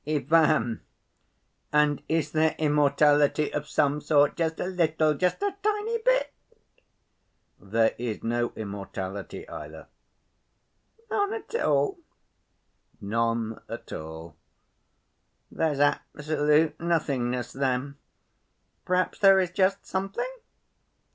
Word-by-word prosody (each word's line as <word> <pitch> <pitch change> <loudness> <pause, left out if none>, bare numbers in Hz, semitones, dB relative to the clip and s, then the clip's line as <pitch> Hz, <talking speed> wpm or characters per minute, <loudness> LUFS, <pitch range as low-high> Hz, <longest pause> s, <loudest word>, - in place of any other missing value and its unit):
"Ivan, 155 -4 +2 0.9
and 150 -1 +2
is 160 -2 0
there 155 0 +2
immortality 150 0 +3
of 150 0 -3
some 150 -1 +1
sort, 145 -1 +3
just 165 -1 -1
a - - -1
little, 160 -4 +1
just 180 - 0
a 400 -1 -1
tiny 425 +2 0
bit?" - - +1 1.3
"There 110 +3 +1
is 120 -3 -4
no 120 +1 0
immortality 100 - -6
either." - - -9 1.2
"None 405 0 +1
at 450 - -9
all?" 405 -5 +1 1.0
"None 115 +1 -1
at - - -7
all." 80 0 -8 1.2
"There's 155 -4 -1
absolute 150 +1 +1
nothingness 130 -8 -1
then. 135 +1 -1 0.9
Perhaps 185 0 0
there 195 -2 +7
is 180 -2 0
just 195 +1 +1
something? 195 - -3
150 Hz, 100 wpm, -27 LUFS, 125-180 Hz, 1.3 s, there